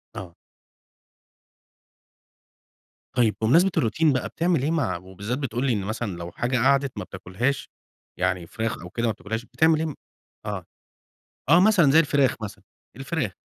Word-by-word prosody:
آه. 90 -3 -8 2.8
طيب 115 -4 +3
بمناسبة 170 +12 +4
الروتين 145 +6 +2
بقى، 130 - -1
بتعمل 170 -5 0
إيه 155 - +1
مع 150 - 0
وبالذات 95 +7 -5
بتقول 130 -2 -2
لي 125 - +2
إن 100 - -1
مثلًا 110 -1 -3
لو 85 0 -7
حاجة 125 +6 -1
قعدت 135 0 +2
ما 105 - -3
بتاكلهاش، 95 +9 -3 0.5
يعني 90 -2 0
فراخ 110 0 -3
أو 90 - -9
كده 115 +3 -2
ما 115 - +2
بتاكلهاش، 110 +2 -5
بتعمل 160 +5 +3
إيه 160 -1 -2 0.5
آه، 100 -4 -4 0.8
آه، 165 - +7
مثلًا 185 -8 +5
زي 160 - +7
الفراخ 145 -4 +2
مثلًا، 105 - -7 0.3
الفراخ، 135 - -2
120 Hz, 145 wpm, -25 LUFS, 105-145 Hz, 2.8 s, آه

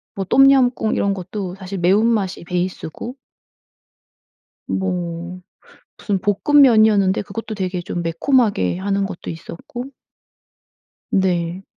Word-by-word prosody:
뭐 195 - -2
똠얌꿍 260 0 +4
이런 200 - +1
것도 185 0 -5
사실 190 0 -7
매운맛이 195 +1 +1
베이스고 180 +5 -4 1.5
뭐 180 -1 -3 0.6
무슨 200 -3 -2
볶음면이었는데 215 - +4
그것도 220 +2 -6
되게 185 -2 -3
좀 175 0 -4
매콤하게 175 - +1
하는 195 +1 -1
것도 190 -3 -7
있었고 170 +9 -8 1.3
네. 180 -1 0
195 Hz, 235 characters per minute, -20 LUFS, 180-220 Hz, 1.5 s, 똠얌꿍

